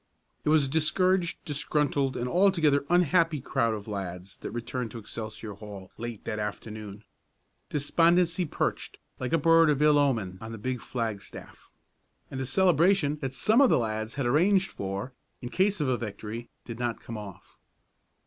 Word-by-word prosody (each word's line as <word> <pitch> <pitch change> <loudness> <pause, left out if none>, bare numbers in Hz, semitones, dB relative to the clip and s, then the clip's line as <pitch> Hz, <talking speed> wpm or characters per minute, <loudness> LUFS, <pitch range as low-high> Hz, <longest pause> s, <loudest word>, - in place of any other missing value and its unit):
It - - 0
was 155 -2 +5
a - - -3
discouraged, 170 +4 +2
disgruntled 145 -2 0
and 120 - -2
altogether 165 -4 +3
unhappy 170 -2 +3
crowd 115 -3 0
of 105 0 -8
lads 95 -2 -6
that - - -5
returned 120 +1 -4
to 115 - -8
Excelsior 110 -1 -7
Hall 100 -2 -10
late 120 -2 -7
that 110 -2 -3
afternoon. 105 0 -6 0.7
Despondency 170 +4 +2
perched 150 - -3 0.2
like 125 -1 -3
a 165 - +4
bird 165 +1 +5
of 145 -2 +2
ill 150 -1 +5
omen 110 -10 0
on 110 0 -7
the - - -6
big 125 +2 -3
flagstaff; 115 -5 -6 0.6
and 135 - -4
a 130 - -3
celebration 175 -2 +3
that 135 -3 -5
some 220 - +4
of 270 - +6
the - - +4
lads 110 -1 -2
had 140 -2 -1
arranged 185 +9 +3
for, 100 +6 -5 0.3
in 120 - -6
case 195 +6 +1
of 150 - 0
a 130 -1 +1
victory, 110 +1 -6 0.2
did 115 -1 -7
not 120 -2 -2
come 115 - -7
off. 100 -2 -12
130 Hz, 170 wpm, -28 LUFS, 110-160 Hz, 0.7 s, of